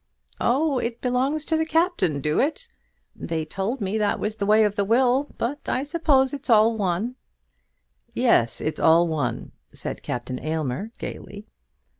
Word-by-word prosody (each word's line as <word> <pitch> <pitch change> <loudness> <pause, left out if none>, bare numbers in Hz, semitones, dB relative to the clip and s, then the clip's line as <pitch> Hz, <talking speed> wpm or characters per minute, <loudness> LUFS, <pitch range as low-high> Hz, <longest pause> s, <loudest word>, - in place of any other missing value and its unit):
"Oh; 275 +2 +1
it 235 0 -3
belongs 265 +5 0
to 320 - 0
the 320 - +1
Captain, 320 - +1
do 150 +2 0
it? 320 - -1 0.5
They 160 -2 -3
told 200 - -3
me 200 +2 -1
that 210 -1 0
was 215 +1 -2
the 200 -2 -3
way 215 +1 +5
of 210 -1 +1
the 200 - +1
will; 255 +6 +2
but 275 +5 -3
I 260 - 0
suppose 290 -3 +2
it's 285 0 -7
all 225 0 +5
one." 210 +5 -2 1.0
"Yes; 230 - +3
it's 155 - -2
all 165 +2 +5
one," 145 -8 -3 0.2
said - - -5
Captain 125 +1 -4
Aylmer, 155 - -2
gaily. 205 +1 -8
220 Hz, 160 wpm, -24 LUFS, 170-270 Hz, 1.0 s, way